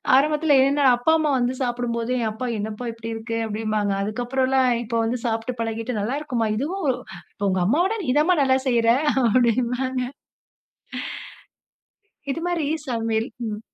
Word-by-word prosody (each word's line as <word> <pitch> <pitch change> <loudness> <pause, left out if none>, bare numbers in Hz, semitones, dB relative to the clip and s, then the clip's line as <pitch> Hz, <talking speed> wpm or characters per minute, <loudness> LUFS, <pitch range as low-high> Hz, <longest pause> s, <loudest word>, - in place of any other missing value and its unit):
ஆரம்பத்ல, 300 +1 +4
என்னோட 280 0 +3
அப்பா, 245 +6 +2
அம்மா 305 -1 +1
வந்து 245 +1 +1
சாப்டும்போது, 240 -1 -2
என் 225 -2 0
அப்பா, 240 +4 -4
"என்னப்பா 215 +3 -4
இப்படி 230 0 -7
இருக்கு?", 230 0 -4
அப்படின்பாங்க, 215 -1 -1
அதுக்ப்பறலாம், 255 +4 +1
இப்போ 230 0 -1
வந்து 240 +2 -1
சாப்பிட்டு 230 +1 -2
பழகிட்டு, 225 +1 -3
"நல்லாருக்குமா. 250 -1 -1
இதுவும் 345 +7 -2 0.6
உங்க 185 0 +1
அம்மாவோட 350 - +2
நீ 255 - -3
தான்மா 345 +4 +4
நல்லா 260 0 +3
செய்யுற", 235 -2 +3 0.4
அப்டின்பாங்க. 255 +1 +1 2.3
இது 320 - -3
மாரி 330 -5 -1 0.2
சமையல், 225 -1 -1 0.2
ம். 210 -1 -4
245 Hz, 130 wpm, -23 LUFS, 225-265 Hz, 2.3 s, ஆரம்பத்ல